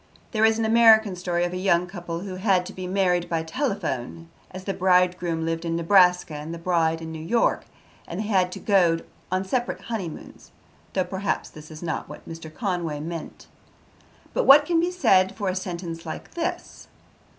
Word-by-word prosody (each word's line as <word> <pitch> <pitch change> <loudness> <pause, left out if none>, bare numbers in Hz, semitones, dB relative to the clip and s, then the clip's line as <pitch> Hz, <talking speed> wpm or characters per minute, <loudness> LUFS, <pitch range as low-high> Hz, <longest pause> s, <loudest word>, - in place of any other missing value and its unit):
There 220 -1 +3
is 220 0 +3
an 225 - 0
American 220 -3 +6
story 175 -1 -1
of 175 - -4
a - - -3
young 180 -2 +2
couple 175 -2 -6
who 190 -1 -6
had 185 -2 +2
to 195 - -8
be 185 -1 -6
married 180 -2 +1
by 165 -1 -1
telephone, 165 - -3 0.2
as 185 0 -9
the 195 - -2
bridegroom 180 -3 +2
lived 165 0 -2
in 165 -1 -2
Nebraska 180 -1 +4
and 150 +2 -6
the 170 - -5
bride 165 -1 0
in 160 - -6
New 160 -1 -7
York, 230 +8 +1 0.4
and 170 - -5
they - - -4
had 190 -4 +2
to - - -7
go 180 -5 +3 0.3
on 185 +1 0
separate 240 +5 -2
honeymoons; 200 -9 -7 0.4
though, 185 - +1
perhaps, 190 +2 -3
this 155 0 -12
is 155 +1 -10
not 165 -2 -3
what - - -11
Mr. 165 -1 -8
Conway 175 -5 -3
meant. 165 +1 -7 0.9
But - - +1
what 290 +2 +8
can 335 +1 +2
be 345 +2 +1
said 190 - +3
for 200 -3 -2
a 185 - -2
sentence 170 -3 -5
like 160 - -7
this? 335 -1 -4
180 Hz, 190 wpm, -24 LUFS, 165-200 Hz, 0.9 s, what